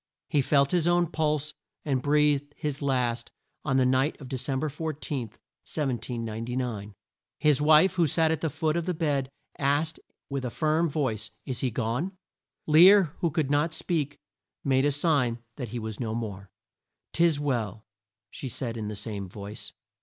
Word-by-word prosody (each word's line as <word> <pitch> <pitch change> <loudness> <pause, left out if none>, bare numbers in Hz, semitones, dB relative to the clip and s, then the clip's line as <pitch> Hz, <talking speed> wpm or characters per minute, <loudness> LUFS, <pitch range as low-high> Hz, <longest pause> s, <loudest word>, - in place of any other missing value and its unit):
He 145 - +3
felt 140 +1 +3
his 175 -2 +2
own 175 0 +4
pulse, 155 -1 0 0.3
and 135 -4 +1
breathed 145 0 +2
his 150 -1 -3
last 125 -4 0 0.3
on 135 -3 +1
the 130 - +4
night 130 +4 +2
of 135 -4 -9
De 135 - -2
cem 130 +1 -1
ber 155 - 0
14, 150 -4 -4
1799. 115 -3 -4 0.4
His 150 -2 +3
wife, 155 +5 +6
who 175 -3 +3
sat 160 +3 +2
at 160 - -1
the 160 - 0
foot 155 +2 0
of 170 0 -1
the 180 - 0
bed, 145 -4 0 0.3
asked 145 +4 +1 0.3
with 140 -2 -3
a 125 - -1
firm 155 +5 +1
voice, 115 -8 -2 0.2
"Is 130 -3 -2
he 130 - +1
gone?" 125 - -2 0.5
Lear, 175 +2 +7
who 170 - +1
could 150 -2 -1
not 150 +2 +2
speak, 155 -4 -1 0.5
made 135 0 +3
a 145 - +3
sign 140 -5 +2 0.2
that 125 -5 -4
he 120 - -4
was 110 -2 -5
no 110 -2 -2
more. 100 -4 -5 0.6
"'Tis 165 -3 +3
well," 115 -7 -2 0.5
said 130 -2 -4
she 115 - -6
in 105 - -3
the 105 - -4
same 100 -2 -5
voice. 100 +4 -7
140 Hz, 170 wpm, -27 LUFS, 120-155 Hz, 0.6 s, Lear